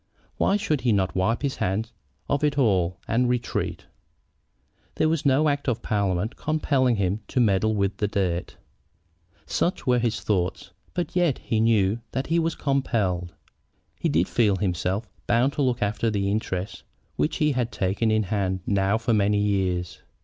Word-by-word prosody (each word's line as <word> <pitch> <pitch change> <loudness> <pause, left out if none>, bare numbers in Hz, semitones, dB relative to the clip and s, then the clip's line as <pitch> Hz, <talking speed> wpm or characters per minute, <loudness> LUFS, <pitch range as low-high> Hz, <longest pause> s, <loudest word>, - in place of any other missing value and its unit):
Why 200 - +2
should 160 -10 -1
he 120 0 +2
not 95 -3 +1
wipe 110 +8 0
his 140 -2 -1
hands 110 +3 -1 0.3
of 145 +1 0
it 145 -1 +1
all 95 -9 +2
and 120 +2 +2
retreat? 125 -1 -2 1.1
There 155 - +2
was 155 -2 +1
no 140 +3 +4
act 145 -1 -1
of 120 - -2
parliament 100 +1 0
compelling 140 -5 +1
him 100 0 0
to - - -1
meddle 110 -1 +3
with 100 -1 0
the 105 - 0
dirt. 90 -4 -2 0.9
Such 175 - -1
were 125 -2 +3
his 115 -2 -1
thoughts. 95 -1 -1 0.2
But 175 -1 -3
yet 175 -7 +2
he 110 - -1
knew 110 -2 +3
that 130 +1 -1
he 165 +1 +1
was 165 0 0
compelled. 100 - -1 0.6
He - - 0
did 85 +3 +2
feel 105 -5 +2
himself 95 +2 -1 0.2
bound 120 +4 +3
to 145 - -2
look 125 -4 +1
after 105 +3 -1
interests 100 -1 -2 0.3
which 75 - 0
he 150 -1 +2
had 125 -3 -1
taken 100 +4 0
in 110 0 +2
hand 95 -1 -1
now 100 +1 +2
for 115 +1 0
many 105 -1 +2
years. 95 -4 -1
110 Hz, 165 wpm, -25 LUFS, 95-130 Hz, 1.1 s, no